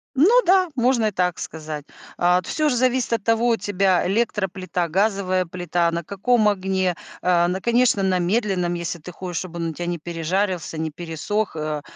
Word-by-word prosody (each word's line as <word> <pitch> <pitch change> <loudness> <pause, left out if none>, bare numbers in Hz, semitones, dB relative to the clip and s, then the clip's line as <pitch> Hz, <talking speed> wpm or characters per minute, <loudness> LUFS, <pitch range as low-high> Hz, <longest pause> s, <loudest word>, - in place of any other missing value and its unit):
Ну 420 - +6
да, 370 0 +4
можно 245 -2 +2
и - - -1
так 180 -2 0
сказать. 155 -2 -6 0.3
А, 180 +1 +3
т 175 - -10
всё 305 -1 +1
же 255 - 0
зависит 255 0 +1
от 225 -3 -1
того, 230 +2 +2
у 230 - +4
тебя 190 -4 +1
электроплита, 190 -4 -1
газовая 190 0 +1
плита, 175 -1 -1
на 170 0 -3
каком 215 +5 +1
огне. 190 -2 0 0.3
Э, 175 -1 +3
на, 185 +2 -2
конечно, 235 -2 +3
на 185 -1 +2
медленном, 180 -2 0
если 170 0 -4
ты 170 +3 -9
хочешь, 175 -1 -5
чтобы 175 -2 -7
он 165 - -1
у 160 - -5
тебя 175 - -5
не 175 -1 -3
пережарился, 175 +1 -2
не 160 0 -2
пересох, 175 +6 -3
э, 155 -1 -3
185 Hz, 190 wpm, -22 LUFS, 170-215 Hz, 0.3 s, Ну